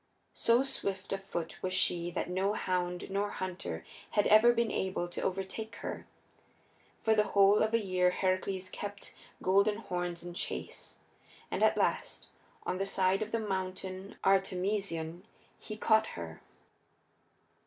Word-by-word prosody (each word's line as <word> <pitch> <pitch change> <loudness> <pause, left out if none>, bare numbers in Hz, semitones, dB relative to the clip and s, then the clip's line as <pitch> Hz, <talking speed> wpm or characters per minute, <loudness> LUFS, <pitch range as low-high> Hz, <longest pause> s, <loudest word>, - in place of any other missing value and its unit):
So 235 +3 +4
swift 195 -8 -3
of 195 0 -3
foot 170 -4 -5
was 185 0 -1
she 175 -2 +2
that 175 - -2
no 190 +3 +1
hound 180 -2 -1
nor 200 +1 0
hunter 185 -2 -5 0.3
had 205 - +5
ever 215 +3 +7
been 235 -2 +1
able 190 -2 -1
to 175 - -5
overtake 195 +4 -3
her. - - -6 1.0
For 220 - +4
the 210 -1 +4
whole 200 +1 +7
of 220 +1 +2
a - - +4
year 185 -3 +2
Heracles 185 0 -1
kept 205 0 -6 0.3
Golden 200 +3 +4
Horns 175 -5 -3
in 175 0 -7
chase, - - -5 0.5
and - - -1
at - - +4
last, - - -1 0.4
on 185 - -1
the 195 - +1
side 190 0 +2
of 215 0 -3
the 230 - +1
Mountain 190 -1 -4
Artemision, 190 -3 +1 0.4
he 215 -1 -7
caught 220 0 +4
her. 85 -2 -7
190 Hz, 145 wpm, -32 LUFS, 180-210 Hz, 1.0 s, ever